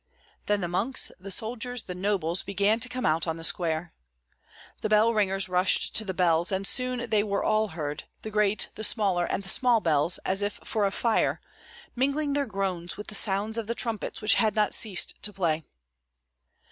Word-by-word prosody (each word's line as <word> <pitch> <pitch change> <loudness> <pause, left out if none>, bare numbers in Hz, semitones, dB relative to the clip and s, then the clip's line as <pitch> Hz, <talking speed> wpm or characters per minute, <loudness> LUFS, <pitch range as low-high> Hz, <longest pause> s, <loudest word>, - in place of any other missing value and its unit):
Then 205 0 +1
the 175 - -1
monks, 210 +10 0
the 195 +2 -9
soldiers, 230 +4 -3
the 180 - -6
nobles, 180 -2 -1
began 200 +3 +1
to 250 - +1
come 255 0 -4
out 160 +2 +1
on 160 0 -2
the 165 - -9
square. 165 -1 0 0.9
The 215 - -2
bell 215 +2 +4
ringers 195 -3 +3
rushed 180 +1 +2
to 220 - +1
the 195 - -3
bells; 170 -1 +2
and 190 +1 -1
soon 250 +1 -1
they 215 -1 +4
were 200 -1 -1
all 215 0 +2
heard, 150 -5 -5 0.2
the 220 - -6
great, 210 -1 +1
the 215 - -7
smaller, 200 -5 +2
and 195 - -3
the 195 - -4
small 245 +2 +4
bells, 160 -2 +2
as 190 +2 +1
if 205 +1 -1
for 210 -2 0
a - - -3
fire, 230 +3 +1 0.6
mingling 280 +3 0
their 285 -1 0
groans 190 -4 -3
with 210 - -8
the - - -10
sounds 210 +2 +1
of 220 - -5
the 235 - -2
trumpets, 230 -2 -2
which 215 - +4
had 215 -2 +1
not 210 -1 +2
ceased 200 -5 +1
to 210 - -2
play. 165 -6 -1
205 Hz, 195 wpm, -27 LUFS, 180-220 Hz, 0.9 s, bell